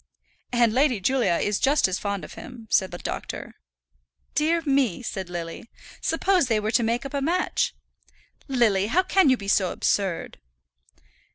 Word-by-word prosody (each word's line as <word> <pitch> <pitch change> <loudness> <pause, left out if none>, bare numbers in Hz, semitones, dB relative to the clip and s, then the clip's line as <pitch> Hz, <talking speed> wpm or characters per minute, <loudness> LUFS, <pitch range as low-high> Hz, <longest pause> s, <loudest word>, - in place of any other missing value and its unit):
"And 240 -2 +3
Lady 260 -3 +2
Julia 245 -2 +2
is 205 +3 0
just 280 -2 +3
as 185 0 -2
fond 200 -2 -3
of - - -11
him," 225 0 -11
said 190 -2 +3
the 175 - -7
doctor. - - -6 0.8
"Dear 325 +3 +1
me!" 270 - +1
said 190 -5 -5
Lily. 170 +5 -6 0.3
"Suppose 355 -1 +2
they 225 -3 +2
were 210 +1 -2
to 240 - +3
make 235 +3 -1
up 275 - -7
a 280 - -1
match!" 345 +6 0 0.7
"Lily, 225 -7 +2
how 345 +11 +2
can 375 -4 +3
you 260 - +4
be 200 - -8
so 190 -2 +2
absurd?" 190 - -1
235 Hz, 165 wpm, -25 LUFS, 200-275 Hz, 0.8 s, you